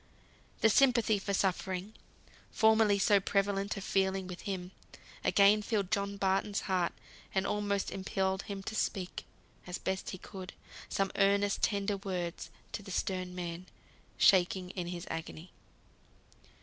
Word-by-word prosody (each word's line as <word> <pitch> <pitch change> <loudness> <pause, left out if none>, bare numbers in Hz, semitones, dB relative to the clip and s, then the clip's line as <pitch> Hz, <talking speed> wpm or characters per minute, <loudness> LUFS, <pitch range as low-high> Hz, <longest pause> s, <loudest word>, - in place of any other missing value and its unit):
The 220 - +6
sympathy 235 -4 +4
for 200 - -3
suffering, 190 +1 -1 0.6
formerly 220 -2 +4
so 200 +1 +4
prevalent 200 +1 0
a - - -4
feeling 190 0 0
with 180 -1 -7
him, 185 -2 -4 0.5
again 205 +1 +5
filled 205 -3 -1
John 200 0 0
Barton's 195 +1 +1
heart, 185 -3 0 0.4
and 190 - +2
almost 205 -1 -1
impelled 190 0 -1
him 195 -1 -6
to 215 - -5
speak 190 -4 -2 0.4
(as 180 - -3
best 190 0 -3
he 185 - -5
could) 185 0 -9 0.4
some 195 -1 0
earnest, 200 0 +3
tender 200 0 +1
words 180 -4 -4 0.2
to - - -4
the 200 - -11
stern 185 -1 -2
man, 175 0 -5 0.5
shaking 180 -1 +4
in 180 -2 -4
his 175 0 -5
agony. 165 +1 -6
195 Hz, 135 wpm, -32 LUFS, 185-200 Hz, 0.6 s, The